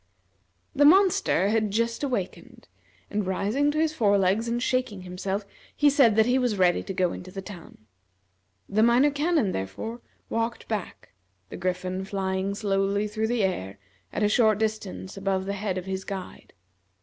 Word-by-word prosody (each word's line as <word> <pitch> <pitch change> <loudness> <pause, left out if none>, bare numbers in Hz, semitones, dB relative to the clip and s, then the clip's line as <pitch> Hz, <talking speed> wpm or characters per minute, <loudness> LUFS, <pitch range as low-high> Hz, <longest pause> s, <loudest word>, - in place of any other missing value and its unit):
The 290 - +4
monster 335 - +4
had 215 -1 +1
just 230 +3 -1
awakened, 240 -10 -4 0.4
and 205 -2 -1
rising 210 +10 +1
to 295 - -2
his 315 0 +1
fore 205 -8 +3
legs 195 +4 +1
and 235 +1 -1
shaking 250 -6 -1
himself, 190 +3 -4 0.3
he 290 -1 +5
said 265 -7 +5
that 220 0 +5
he 250 +2 +2
was 245 -5 0
ready 180 -2 +3
to - - -6
go 180 -2 +1
into 185 - -8
the 195 - -7
town. 175 - -12 0.8
The 210 +2 +1
Minor 240 +5 +5
Canon, 295 - +1
therefore, 105 - -5 0.3
walked 230 +1 -3
back, 210 - -5 0.4
the - - -7
Griffin 185 +1 -2
flying 190 0 -2
slowly 200 0 0
through 215 +1 -2
the 235 -2 0
air, 100 - -2 0.3
at - - -2
a - - +4
short 215 -1 +3
distance 215 -3 -3
above 195 -1 -1
the 200 - -2
head 200 -2 -3
of 185 - -4
his 190 0 -4
guide. 190 -2 -8
205 Hz, 170 wpm, -26 LUFS, 190-235 Hz, 0.8 s, he